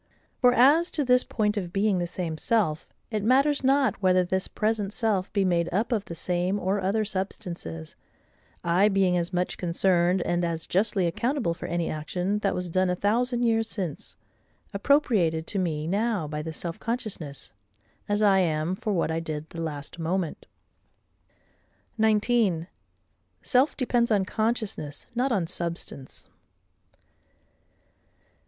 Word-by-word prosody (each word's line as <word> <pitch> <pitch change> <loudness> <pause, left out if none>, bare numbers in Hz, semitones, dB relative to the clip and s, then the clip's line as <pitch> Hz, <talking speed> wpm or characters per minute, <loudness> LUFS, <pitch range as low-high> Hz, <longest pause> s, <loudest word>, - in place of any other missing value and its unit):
For 250 -2 +6
as 285 +8 +5
to 295 - +1
this 250 0 +4
point 210 -1 -1
of 180 -4 -3
being 200 +1 +1
the 175 - -1
same 170 -2 -4
self, 175 -5 0 0.2
it 215 -2 -1
matters 275 +5 +3
not 270 -4 +2
whether 185 -1 +4
this 190 +1 -1
present 215 -2 -1
self 205 -5 0
be 200 -2 +1
made 170 -2 +1
up 210 +8 0
of 215 -4 0
the 170 - -7
same 180 +4 -1
or 195 +2 0
other 205 +3 +1
substances—I 175 - -3
being 195 -2 +2
as 175 0 0
much 180 0 -2
concerned, 175 +1 +2
and 175 0 0
as 165 -2 -2
justly 195 0 +1
accountable 230 - 0
for 170 - -7
any 170 0 -1
action 180 +6 -2
that 200 -2 0
was 180 0 -3
done 185 +2 +1
a 180 - +1
thousand 240 +5 +1
years 225 -1 +2
since, 180 -10 -5 0.6
appropriated 200 - +2
to 200 - -2
me 155 -4 -1
now 200 -1 0
by 150 0 -4
this 160 0 -6
self 170 -1 -5
consciousness, 205 - -5 0.6
as 205 +1 +1
I 195 -2 +5
am 160 -1 0
for 210 +2 -2
what 165 -3 0
I 160 - -1
did 155 -1 -6
the 165 - -6
last 150 0 -6
moment. 170 0 -2 1.5
19. 215 -5 +2 0.8
Self 260 +3 +2
depends 240 -2 +1
on 205 -4 +2
Consciousness, 215 -9 -2
not 255 +3 0
on 195 -7 +1
Substance. 170 -5 -4
190 Hz, 150 wpm, -26 LUFS, 170-220 Hz, 1.5 s, For